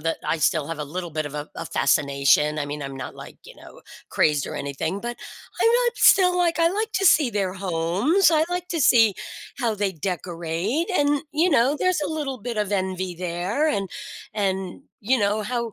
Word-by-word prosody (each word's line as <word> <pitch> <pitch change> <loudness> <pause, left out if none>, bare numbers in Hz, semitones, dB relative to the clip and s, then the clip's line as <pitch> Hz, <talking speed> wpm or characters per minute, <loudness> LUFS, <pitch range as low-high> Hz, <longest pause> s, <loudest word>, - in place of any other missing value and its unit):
that 165 +1 -2
I 165 - 0
still 155 -1 +1
have 165 -1 -5
a 150 - -3
little 175 +4 -6
bit 155 0 -3
of 145 - -8
a 150 +1 -5
a 165 - -5
fascination, 140 +2 +2
I 145 - -2
mean, 145 +1 -5
I'm 135 -1 -6
not, 130 - -7
like, - - -11
you - - -13
know, - - -15 0.3
crazed 150 -2 +2
or - - -6
anything, 140 +7 -3
but 240 +1 -5 0.5
I'm 455 - +5 0.2
not 480 - +1
still 360 -2 +5
like, 345 -1 +1
I 335 0 +4
like 435 +4 -2
to 390 0 +1
see 290 -7 +5
their 195 -3 -2
homes. 190 - +1
I 315 -1 +3
like 360 0 -3
to 330 -3 -2
see 225 -6 +5 0.4
how 230 -4 0
they 200 -2 -1
decorate, 175 - -3
and, 290 -5 +1
you 325 +4 +2
know, 275 +1 +3
there's 370 -3 +1
a 295 - -2
little 280 -4 -3
bit 235 +1 -5
of 210 -1 -1
envy 185 -2 -2
there 180 - -1
and 195 -9 -1 0.5
and, 190 +1 -2 0.2
you 245 +4 +1
know, 210 +1 0
how 235 0 -3
200 Hz, 205 wpm, -23 LUFS, -, 0.5 s, I'm